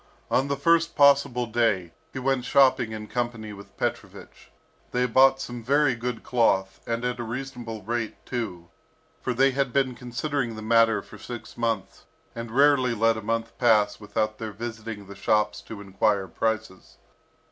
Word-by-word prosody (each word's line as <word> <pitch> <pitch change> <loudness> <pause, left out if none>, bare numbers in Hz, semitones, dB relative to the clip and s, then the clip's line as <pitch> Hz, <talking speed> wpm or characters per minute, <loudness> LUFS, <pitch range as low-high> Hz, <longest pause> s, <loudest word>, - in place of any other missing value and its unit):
On 135 - +2
the 140 0 -1
first 165 +3 +2
possible 140 -4 +4
day, 110 -7 0 0.2
he - - -8
went 130 -1 0
shopping 130 -4 +4
in 110 -1 -6
company 115 -2 -3
with 100 0 -13
Petrovich. - - -5 0.4
They 125 0 +2
bought 135 +2 +5
some 120 -2 -6
very 140 +2 +3
good 120 0 -4
cloth, 95 -6 +1
and 115 +1 -2
at 125 0 -2
a - - -2
reasonable 120 -2 -6
rate 115 +1 -2
too, 95 -9 -5 0.5
for 125 - -2
they 135 +2 +4
had 135 -1 0
been 135 0 +1
considering 125 0 -3
the 110 - -7
matter 115 0 +3
for - - -13
six 120 -2 -8
months, 115 -4 -3 0.3
and 115 0 -6
rarely 130 -1 +4
let 115 +1 +3
a 110 - -5
month 115 +1 -2
pass 110 -4 +3
without 110 +1 -2
their 110 -1 -4
visiting 110 -1 -6
the 100 - -10
shops 105 +2 +1
to 105 -2 -9
enquire 95 0 0
prices. 105 - -3
115 Hz, 165 wpm, -26 LUFS, 110-130 Hz, 0.5 s, bought